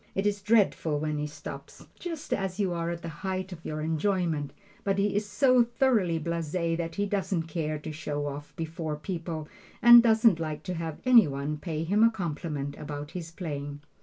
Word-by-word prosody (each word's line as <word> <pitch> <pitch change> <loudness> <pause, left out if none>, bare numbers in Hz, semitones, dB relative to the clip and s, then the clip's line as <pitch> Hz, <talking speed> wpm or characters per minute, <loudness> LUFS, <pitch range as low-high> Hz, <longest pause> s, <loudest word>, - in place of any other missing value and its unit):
It 195 - 0
is 205 -1 +1
dreadful 200 -7 +2
when 150 0 -2
he 150 - -2
stops, 150 0 -9
just 330 -4 -4
as 195 0 -2
you 190 -3 +1
are 170 0 -2
at 170 0 -5
the - - -4
height 190 -1 -3
of 165 -2 -9
your 155 0 -4
enjoyment, 160 -2 0 0.3
but 195 -1 +1
he 200 0 +1
is 205 0 0
so 250 +5 +5
thoroughly 230 -8 +2
blase 165 -1 -3
that 170 -1 -1
he 205 - 0
doesn't 195 -4 -1
care 155 -2 -3
to 150 +1 -7
show 145 -1 -3
off 145 +1 -6
before 160 -1 -4
people 160 -1 -5 0.3
and 240 0 +10
doesn't 225 -5 +4
like 155 -2 -4
to 180 - -3
have 165 -2 -4
any 240 -7 +7
one 140 +2 -3
pay 160 -1 -3
him 200 +6 +3
a 230 - +7
compliment 150 -8 -4
about 145 0 -6
his 170 -3 -6
playing. 145 -4 -5
170 Hz, 190 wpm, -28 LUFS, 150-200 Hz, 0.3 s, and